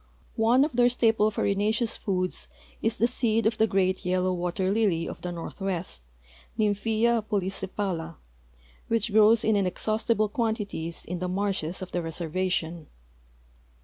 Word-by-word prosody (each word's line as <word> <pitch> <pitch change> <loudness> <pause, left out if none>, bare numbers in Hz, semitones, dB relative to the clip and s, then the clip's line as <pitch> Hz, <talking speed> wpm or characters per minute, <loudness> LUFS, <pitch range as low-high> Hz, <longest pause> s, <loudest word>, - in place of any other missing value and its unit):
One 235 +5 +4
of 305 - -4
their 245 0 +4
staple 225 -3 +3
farinaceous 215 +3 0
foods 185 -2 -2 0.3
is 225 +1 0
the 230 - +3
seed 230 -2 +1
of 220 0 +1
the 220 - +4
great 190 -2 +1
yellow 185 0 +1
water 180 +2 -1
lily 195 -6 +1
of - - -7
the 180 - -4
northwest, 175 - -4 0.6
Nymphaea 220 +2 +2
polysepala, 190 -3 -2 0.7
which 225 -1 +1
grows 215 +1 +6
in 220 - +3
inexhaustible 215 +3 +1
quantities 205 -7 -2
in 180 0 -4
the 180 - -2
marshes 185 -3 -2
of 185 - -9
the 175 - -1
reservation. 165 0 -2
200 Hz, 135 wpm, -27 LUFS, 180-220 Hz, 0.7 s, grows